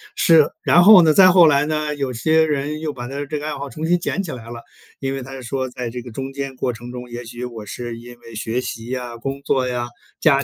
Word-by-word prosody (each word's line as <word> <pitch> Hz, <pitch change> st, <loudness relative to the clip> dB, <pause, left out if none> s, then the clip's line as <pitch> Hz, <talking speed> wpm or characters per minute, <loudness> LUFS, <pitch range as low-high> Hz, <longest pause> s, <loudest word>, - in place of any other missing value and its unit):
是 160 Hz, -3 st, +5 dB
然 175 Hz, -, +5 dB
后 195 Hz, -2 st, +9 dB
呢， 155 Hz, -1 st, +4 dB
再 185 Hz, +2 st, +8 dB
后 180 Hz, -2 st, +7 dB
来 145 Hz, -2 st, +4 dB
呢， 155 Hz, -1 st, -1 dB
有 135 Hz, -2 st, -2 dB
些 160 Hz, +6 st, +2 dB
人 150 Hz, +1 st, -2 dB
又 155 Hz, -1 st, -3 dB
把 120 Hz, -3 st, -7 dB
他 140 Hz, +2 st, -4 dB
这 150 Hz, -, -3 dB
个 145 Hz, -, -7 dB
爱 155 Hz, -, -3 dB
好 140 Hz, 0 st, -6 dB
重 155 Hz, +3 st, -5 dB
新 175 Hz, +2 st, +2 dB
捡 195 Hz, +3 st, -2 dB
起 170 Hz, -, -6 dB
来 115 Hz, -2 st, -9 dB
了， 120 Hz, 0 st, -8 dB, 0.4 s
因 135 Hz, 0 st, -2 dB
为 135 Hz, -, -4 dB
他 135 Hz, +1 st, -9 dB
是 135 Hz, -1 st, -8 dB
说 130 Hz, +1 st, -3 dB
在 125 Hz, -1 st, -5 dB
这 125 Hz, +1 st, -6 dB
个 120 Hz, 0 st, -10 dB
中 135 Hz, +4 st, -6 dB
间 135 Hz, -1 st, -5 dB
过 125 Hz, -1 st, -2 dB
程 120 Hz, +2 st, -9 dB
中， 125 Hz, 0 st, -8 dB
也 120 Hz, +1 st, -6 dB
许 120 Hz, +1 st, -7 dB
我 115 Hz, -3 st, -8 dB
是 120 Hz, +1 st, -6 dB
因 120 Hz, 0 st, -13 dB
为 115 Hz, -, -14 dB
学 115 Hz, +3 st, -2 dB
习 115 Hz, -2 st, -6 dB
呀、 125 Hz, -2 st, -5 dB
工 135 Hz, +4 st, -4 dB
作 130 Hz, -1 st, +1 dB
呀、 120 Hz, -1 st, -2 dB, 0.3 s
家 140 Hz, -4 st, +4 dB
135 Hz, 290 characters per minute, -20 LUFS, 120-150 Hz, 0.4 s, 后